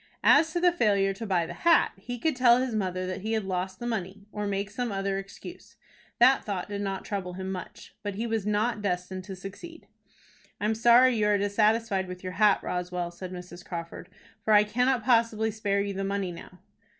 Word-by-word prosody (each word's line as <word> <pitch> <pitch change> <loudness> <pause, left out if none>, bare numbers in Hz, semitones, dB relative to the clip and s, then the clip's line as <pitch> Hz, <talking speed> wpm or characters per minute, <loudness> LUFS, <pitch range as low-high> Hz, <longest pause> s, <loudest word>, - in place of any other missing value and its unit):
As 320 +2 +5
to 345 - -1
the 355 0 +4
failure 200 - +2
to 225 +3 -7
buy 180 -4 +1
the 170 - -7
hat, 335 - +4
he 245 +6 -7
could 305 +4 0
tell 245 -1 +6
his 255 -2 -1
mother 185 -3 -2
that 185 +1 -4
he 220 +3 -2
had 220 -1 0
lost 185 0 -3
the 240 - -6
money, 200 -3 -4
or 210 0 -3
make 200 0 -2
some 240 +1 -3
other 195 0 -1
excuse. 195 - -11 0.4
That 255 +3 +5
thought 195 -4 -3
did 205 -1 -4
not 195 -1 -3
trouble 190 -4 -4
him 190 +1 -5
much. 185 -1 -8
But 205 -1 -4
he 225 +4 -2
was 225 -2 -1
not 210 +2 0
destined 185 -1 -3
to 190 -1 -7
succeed. 205 - -10 0.7
"I 205 - -2
am 215 - +2
sorry 240 +3 +5
you 210 -2 +2
are 205 -1 +3
dissatisfied 205 -1 +1
with 180 0 -8
your 185 0 -5
hat, 210 -1 +3
Roswell," 180 -1 -3
said 180 +1 -8
Mrs. 180 -1 -9
Crawford, 170 -1 -7 0.3
"for 215 - +2
I 210 - +7
cannot 245 +3 +1
possibly 230 -2 +2
spare 200 -2 0
you 200 0 -3
the 195 +1 -3
money 195 -2 -2
now." 175 +1 -11
200 Hz, 210 wpm, -27 LUFS, 190-225 Hz, 0.7 s, I